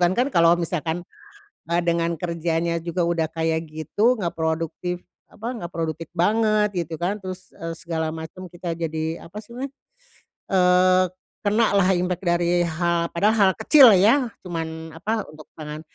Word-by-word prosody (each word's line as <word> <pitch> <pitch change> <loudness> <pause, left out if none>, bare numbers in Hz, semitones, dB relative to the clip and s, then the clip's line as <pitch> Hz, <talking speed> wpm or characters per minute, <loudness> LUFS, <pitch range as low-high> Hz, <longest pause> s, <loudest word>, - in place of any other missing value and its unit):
kan 175 +1 +3
kan 250 +3 +2
kalau 170 0 +5
misalkan 170 0 -2 0.7
a 170 - +2
dengan 170 0 +1
kerjanya 170 0 -1
juga 170 +1 -2
udah 170 -2 0
kayak 160 0 -1
gitu 160 - +1
enggak 175 -5 -2
produktif, 165 +2 -2 0.3
apa 220 +2 -8
enggak 175 -9 -7
produktif 165 -1 -3
banget 210 +3 +2
gitu 160 +1 -6
kan 195 +5 -1
terus, 185 0 -8
eee, 165 0 -5
segala 160 -1 -3
macem 165 +3 -8
kita 175 -1 -5
jadi 160 0 -3
apa 185 +5 -11
sih 235 - -19
namanya, 265 +2 -4 0.8
eee, 185 0 +5 0.4
kena 215 +2 +3
lah 195 -2 +4
impact 180 0 -1
dari 175 0 +2
hal 170 0 0
padahal 205 +2 +3
kecil 280 -5 +8
ya 240 +5 +4 0.2
cuman 160 -2 -5
apa 215 +6 -2
untuk 155 0 -13
tangan. 150 0 -7
170 Hz, 155 wpm, -23 LUFS, 165-190 Hz, 0.8 s, kecil